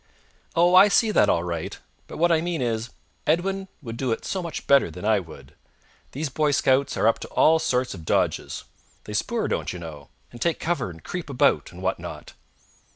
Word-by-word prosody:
"Oh, 175 +2 +4
I 185 +3 +9
see 215 +2 +3
that - - +4
all 85 - +2
right, 85 -2 -4 0.3
but - - -9
what 170 +1 +3
I 160 -1 +3
mean 170 -1 -2
is, 115 -1 -1 0.4
Edwin 190 +4 0 0.2
would 115 -2 -6
do 130 -2 -1
it 115 - -2
so 190 - -2
much 170 -3 -6
better 140 -9 +5
than 90 +5 -8
I 110 -1 +4
would. 80 -7 -12 0.6
These 145 +2 -3
Boy 150 +2 +1
Scouts 135 -1 +2
are - - +1
up 115 - +3
to - - -7
all 160 +1 +4
sorts 130 -6 0
of 90 -4 -9
dodges. - - -1 0.4
They - - -8
spoor, - - -1
don't - - -2
you 90 - -6
know, 80 -4 -9 0.2
and 120 - -12
take 170 -1 +1
cover 150 - -1
and 80 -2 -12
creep 175 -4 -5
about, 135 - +2
and 90 +2 -11
what 95 0 0
not." - - -9
130 Hz, 210 wpm, -24 LUFS, -, 0.6 s, I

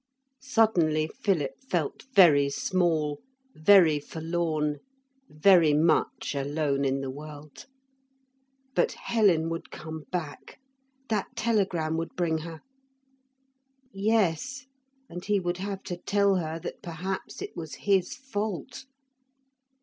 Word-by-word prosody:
Suddenly 175 -11 +2
Philip 165 -9 +1 0.2
felt 165 - -2
very 145 -7 +6
small, 155 -2 0 0.3
very 160 -2 +5
forlorn, 160 -1 -2 0.5
very 160 -1 +5
much 160 0 +1
alone 140 0 -1
in 135 0 0
the 135 -1 -4
world. 150 - -11 1.1
But - - +2
Helen 190 -8 +2
would 165 0 -5
come 160 -1 -8
back. 170 - -5 0.5
That 215 -3 0
telegram 190 -9 0
would 165 0 -4
bring 165 -3 0
her. 160 0 -8 1.3
Yes. 220 - 0 0.4
And 175 -4 -8
he 205 0 +1
would 175 -1 -2
have 195 0 -4
to 175 - -5
tell 200 +1 +2
her 160 -2 -3
that - - -7
perhaps 185 +3 -5
it - - -7
was 160 -3 -6
his 195 -3 +2
fault. 220 -3 -5
170 Hz, 110 wpm, -27 LUFS, 155-195 Hz, 1.3 s, very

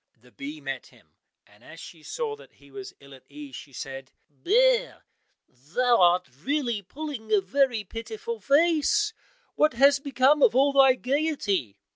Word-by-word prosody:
The 125 +2 -22
bee 145 +4 -8
met 135 -3 -6
him, - - -24 0.3
and 105 +2 -24
as 165 +1 -13
she 165 - -12
saw 440 - -4
that - - -18
he - - -21
was 395 -1 -9
ill 140 0 -16
at 130 - -15
ease, 295 -2 -10
she 140 - -11
said, 135 0 -8 0.2
"Bear, - - +1 0.4
thou 190 - 0
art 175 0 +3
really 260 -7 -1
pulling 260 - -8
a 210 - +5
very 235 +3 0
pitiful 435 - -7
face; 330 +7 +2 0.4
what 305 -3 +2
has 280 +4 +4
become 275 +1 +2
of 240 - +4
all 275 +2 +3
thy 270 -2 +6
gaiety?" 250 - -2
255 Hz, 160 wpm, -25 LUFS, -, 0.4 s, thy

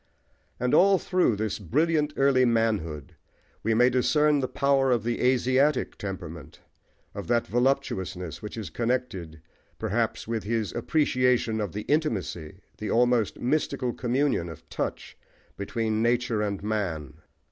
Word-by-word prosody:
And 125 0 0
all 195 +1 +6
through 180 - +1
this 110 +1 -2
brilliant 150 - +1
early 135 -2 +4
manhood 110 - 0 0.5
we 110 +1 +1
may 125 +2 +5
discern 150 +4 +3
the 130 - -1
power 135 +1 +2
of 120 -4 +2
the 120 +1 -2
"Asiatic" 130 +3 +2
temperament, 80 -6 -7 0.5
of - - -6
that 120 -1 +2
voluptuousness, 95 - -1
which 105 +2 -7
is 105 -9 -6
connected 95 - -3 0.3
perhaps 110 +1 -1
with 115 -1 -2
his 110 -1 -2
appreciation 125 -7 +1
of 100 -5 -3
the 105 - -4
intimacy, 100 - -2 0.2
the 105 - -4
almost 120 -2 +2
mystical 130 -2 0
communion 125 -7 0
of 80 -1 -11
touch, - - -5 0.4
between 110 +2 -2
nature 120 -1 +1
and 100 -2 -2
man. 90 -10 -3
115 Hz, 135 wpm, -26 LUFS, 100-130 Hz, 0.5 s, all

